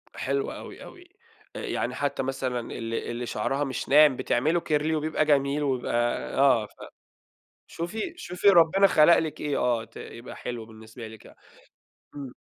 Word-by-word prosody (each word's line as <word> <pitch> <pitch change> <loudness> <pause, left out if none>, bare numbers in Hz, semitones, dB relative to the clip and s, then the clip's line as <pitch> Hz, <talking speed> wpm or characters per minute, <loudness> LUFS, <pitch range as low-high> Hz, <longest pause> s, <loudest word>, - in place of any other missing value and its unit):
حلو 415 +1 -2
أوي - - -10
أوي. 365 -1 -13 0.5
يعني - - -3
حتّى 140 -2 -2
مثلًا 130 -2 -2
ال 115 0 -6
اللي 120 +1 -3
شعرها 135 +6 -1
مش 135 -3 -4
ناعم 145 -1 +6
بتعمله 155 +10 +1
كيرلي 155 0 0
وبيبقى 155 0 0
جميل 145 0 +2
وبيبقى 130 -3 -1 0.4
آه 130 -6 +4
ف - - -16 1.0
شوفي 215 - -5
شوفي 200 - 0
ربنا 185 +2 +6
خلق 170 -2 +6
لِك 160 -2 -3
إيه، 145 -2 -1
آه 120 -2 +1
ت 115 - -24
يبقى 115 +2 -9
حلو 120 -2 -6
بالنسبة 110 +1 -11
لِك 110 -1 -13
يع - - -15 0.8
إمم. 135 -3 -7
140 Hz, 155 wpm, -26 LUFS, 120-160 Hz, 1.0 s, ناعم